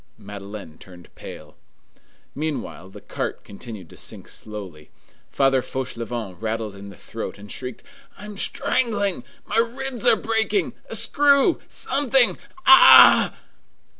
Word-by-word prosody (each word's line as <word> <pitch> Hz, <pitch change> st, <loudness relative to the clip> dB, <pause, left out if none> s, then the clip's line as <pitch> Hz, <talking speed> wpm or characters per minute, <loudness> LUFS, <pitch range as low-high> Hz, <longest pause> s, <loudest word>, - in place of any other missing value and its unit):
Madeleine 100 Hz, -4 st, -10 dB
turned 90 Hz, -2 st, -16 dB
pale. -, -, -12 dB, 0.8 s
Meanwhile, 145 Hz, -, -5 dB
the -, -, -13 dB
cart -, -, -5 dB
continued 100 Hz, -2 st, -11 dB
to -, -, -14 dB
sink -, -, -8 dB
slowly. 95 Hz, -8 st, -9 dB, 0.4 s
Father 135 Hz, -1 st, +2 dB
Fauchelevent 120 Hz, -6 st, -6 dB
rattled 110 Hz, -2 st, -4 dB
in 100 Hz, 0 st, -11 dB
the 100 Hz, -, -14 dB
throat, -, -, -8 dB
and 100 Hz, 0 st, -12 dB
shrieked:— 125 Hz, -2 st, -8 dB, 0.3 s
"I 205 Hz, -, -11 dB
am 210 Hz, 0 st, -9 dB
strangling! 205 Hz, -2 st, -1 dB, 0.2 s
My 210 Hz, -, -2 dB
ribs 245 Hz, +1 st, -1 dB
are 235 Hz, -, +7 dB
breaking! 225 Hz, -, -1 dB, 0.2 s
a -, -, -5 dB
screw! 285 Hz, +3 st, +3 dB
something! 270 Hz, -2 st, +2 dB, 0.3 s
Ah!" 355 Hz, +1 st, +8 dB
130 Hz, 125 wpm, -22 LUFS, -, 0.8 s, Ah